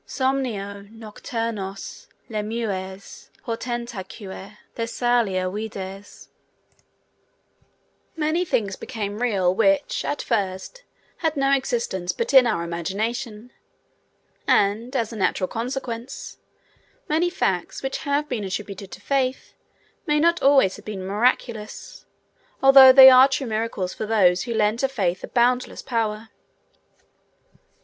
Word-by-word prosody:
'Somnio 215 -7 -3
nocturnos 220 -2 -6 0.2
lemures 210 -3 -5
portentaque 225 -5 -6 0.2
Thessalia 230 -5 0
vides'. 195 -1 -7 1.9
Many 320 +2 0
things 205 - -1
become 210 -4 -5
real 195 -7 +2
which, 290 +8 +1
at 290 - -3
first, 200 - -3 0.4
had 320 -3 -1
no 275 0 +2
existence 235 -9 -1
but 470 - -3
in 260 -2 +8
our 190 -7 -1
imagination, 210 +7 -4 1.0
and, 220 +6 +1
as 230 -3 -1
a - - -7
natural 190 -2 0
consequence, 245 +2 -5 0.7
many 325 +3 +1
facts 190 - -2
which 270 - -3
have 290 0 -1
been 245 -7 -3
attributed 195 0 -6
to - - -10
Faith 265 -2 -1 0.5
may 300 0 +2
not 340 +2 +2
always 270 -8 +4
have - - -15
been 195 -3 -6
miraculous, 215 +1 -2 0.6
although 270 -1 +10
they 265 0 +10
are 255 +1 +8
true 270 0 -2
miracles 215 -5 -3
for 215 - -5
those 185 -5 +3
who 235 - -3
lend 215 +1 +1
to 270 - +2
Faith 190 -9 -2
a - - -5
boundless 250 +1 0
power. 225 -3 -2
225 Hz, 115 wpm, -23 LUFS, 200-260 Hz, 1.9 s, although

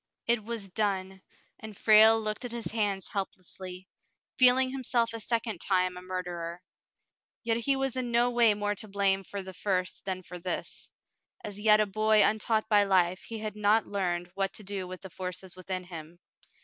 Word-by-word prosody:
It 235 -2 +1
was 225 -2 -5
done, 190 -1 -2 0.4
and 215 -3 -9
Frale 220 +1 +7
looked 215 +2 -3
at 245 - -5
his 235 -1 -5
hands 205 -4 -1
helplessly, 185 -1 -6 0.5
feeling 255 +1 +5
himself 240 -3 0
a 230 - -4
second 225 -3 -2
time 185 -1 +1
a 180 - -8
murderer. 180 -1 -5 0.8
Yet 230 -1 +1
he 270 +4 +1
was 270 -1 -1
in 255 -2 -2
no 240 +1 +3
way 235 -3 +4
more 205 0 -1
to 205 +2 -7
blame 195 -1 +1
for 200 +1 -6
the 190 0 -8
first 185 0 -2
than 185 -1 -3
for 180 0 -9
this. 180 +1 -4 0.5
As 205 -1 -6
yet 210 0 +6
a 215 - +4
boy 215 +1 +3
untaught 220 +1 +2
by 210 -2 +5
life, 185 -2 +2
he 225 - -5
had 215 -1 -5
not 210 +1 +3
learned 175 -3 -2
what 195 0 -1
to 215 - -8
do 195 -2 -4
with 185 0 -8
the 190 -2 -10
forces 185 0 -6
within 185 0 -4
him. 170 -2 -9
200 Hz, 185 wpm, -29 LUFS, 185-220 Hz, 0.8 s, Frale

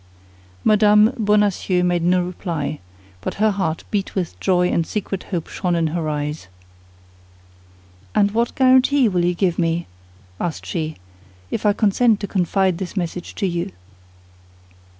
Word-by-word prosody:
Mme. 210 0 +5
Bonacieux 205 -3 +2
made 175 -1 +1
no 180 +1 +2
reply; 170 -5 -4 0.4
but - - -4
her 215 +1 +2
heart 190 -5 -2
beat 200 -3 -2
with 180 -4 -3
joy 180 -2 +2
and 170 -2 0
secret 195 -3 -4
hope 170 -5 -4
shone 180 -2 -1
in 165 -1 +1
her 165 -3 -1
eyes. 150 -5 -3 1.7
"And 200 0 +3
what 230 +2 0
guarantee 260 0 +4
will 180 -4 +1
you 175 0 +1
give 175 -1 0
me," 165 0 0 0.5
asked 170 -3 -3
she, 160 -2 -3 0.6
"if - - -1
I 205 - +4
consent 215 +1 +3
to 200 - -3
confide 185 -1 +1
this 190 +1 -6
message 175 0 -4
to - - -1
you?" 170 - -2
185 Hz, 145 wpm, -21 LUFS, 170-210 Hz, 1.7 s, Mme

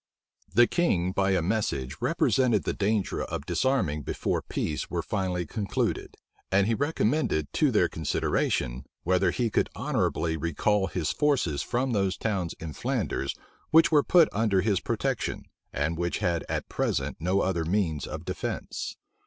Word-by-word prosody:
The 120 - +8
king 95 - +1
by 95 +1 +1
a 90 -3 +1
message 85 - -1
represented 125 -6 +2
the - - -1
danger 105 0 0
of 70 - -5
disarming 85 - +1
before - - -2
peace 75 - -3
were - - -2
finally 90 -3 -1
concluded; 100 +5 -2 0.3
and 100 0 +4
he 115 - +1
recommended 135 - 0
to - - +3
their - - +3
consideration, 60 +2 -1 0.2
whether 90 +1 +3
he 115 +4 0
could - - +1
honorably 80 0 0
recall 95 +6 +1
his 85 -5 -1
forces 130 - +1
from 125 +2 -1
those 95 -4 +1
towns 95 -6 -2
in 80 -2 -6
Flanders 70 0 -2 0.3
which 165 +2 +6
were 150 -2 +6
put 170 +2 +5
under 100 -3 +2
his 100 -1 +1
protection, - - -2 0.3
and 80 +3 -1
which 85 0 0
had 85 -1 0
at - - -2
present - - -1
no 90 +5 +1
other 90 -3 0
means 85 -4 0
of - - -6
defence. - - -4
95 Hz, 155 wpm, -27 LUFS, 85-110 Hz, 0.3 s, The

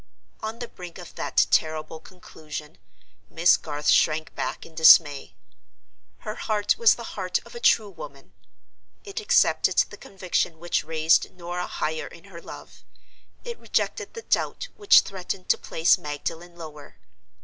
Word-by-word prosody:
On 220 +1 -5
the 240 0 -6
brink 180 -5 -11
of 180 -3 -11
that - - +1
terrible 155 0 0
conclusion, 155 -4 -10 0.5
Miss 170 +2 +4
Garth 150 -1 -6
shrank 155 +1 +3
back - - -4
in 165 - -15
dismay. 160 -2 +5 0.9
Her 215 - -5
heart 210 -2 0
was 465 -1 +6
the - - -9
heart - - -1
of - - -14
a 475 - -7
true 220 - +3
woman. 140 -6 -12 0.7
It 400 +1 -6
accepted 425 - +2
the - - +1
conviction 180 -3 -2
which 175 +2 -1
raised 160 +1 +2
Norah 175 0 -4
higher 155 +1 -3
in 170 - -14
her 185 -4 -12
love: - - -12 0.6
it 475 -1 -7
rejected - - -2
the 460 - -7
doubt - - -1
which 410 -2 +6
threatened 185 -1 -6
to - - +4
place 165 +1 +2
Magdalen 165 +4 -6
lower. 150 - -11
170 Hz, 150 wpm, -25 LUFS, 155-200 Hz, 0.9 s, was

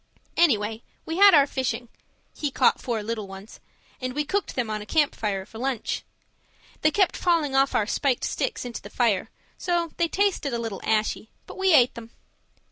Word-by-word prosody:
Anyway, 225 -9 +2 0.2
we 325 +1 -3
had 400 -2 +8
our 285 -2 +6
fishing 260 -3 -3 0.5
(he 295 - -2
caught - - +2
four 230 -4 -2
little 215 -2 -4
ones) 195 +2 -11 0.4
and 255 0 -3
we 295 +2 -1
cooked 395 +6 -2
them 250 -3 -1
on 215 -1 -3
a - - -8
camp 300 +1 +2
fire 195 -3 -3
for 220 - -11
lunch. 260 -2 -2 0.8
They 310 - +4
kept 385 +4 +2
falling 330 -6 +1
off 270 0 +3
our 210 - +2
spiked 255 +3 0
sticks 450 - -2
into 240 -1 -6
the - - -10
fire, 225 -4 +1 0.3
so 345 -2 0
they 340 - +2
tasted 365 -8 0
a - - -2
little 225 -4 -5
ashy, 215 0 0 0.2
but - - -10
we 380 0 +2
ate 250 -3 +5
them. 230 -1 -10
255 Hz, 190 wpm, -25 LUFS, 220-320 Hz, 0.8 s, had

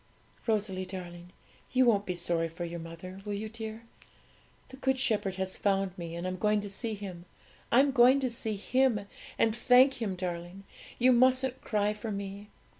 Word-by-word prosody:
'Rosalie, 205 -4 0
darling, 175 -2 -8 0.4
you 255 0 +4
won't 205 -4 +3
be 180 - -1
sorry 170 -1 0
for 165 +2 -6
your 170 0 -5
mother; 165 +3 -9
will 205 0 -3
you, 215 +2 -4
dear? 220 0 -7 0.9
The 265 - -11
Good 265 -1 +1
Shepherd 215 -7 0
has 190 0 -3
found 195 -2 0
me, 170 -2 -6
and 170 +1 -4
I'm 185 0 -3
going 210 +2 +2
to 205 -1 -7
see 220 +2 -3
Him. 185 -4 -8 0.5
I'm 270 +4 +5
going 255 +1 +6
to 260 - 0
see 220 -2 -3
Him, 250 +1 +2 0.4
and 225 -1 +2
thank 255 +2 +5
Him, 200 -4 -1
darling; 180 +1 -5 0.3
you 255 +1 +5
mustn't 255 +1 +3
cry 210 -1 0
for 210 +1 -6
me. 200 +1 -6
205 Hz, 180 wpm, -30 LUFS, 185-235 Hz, 0.9 s, going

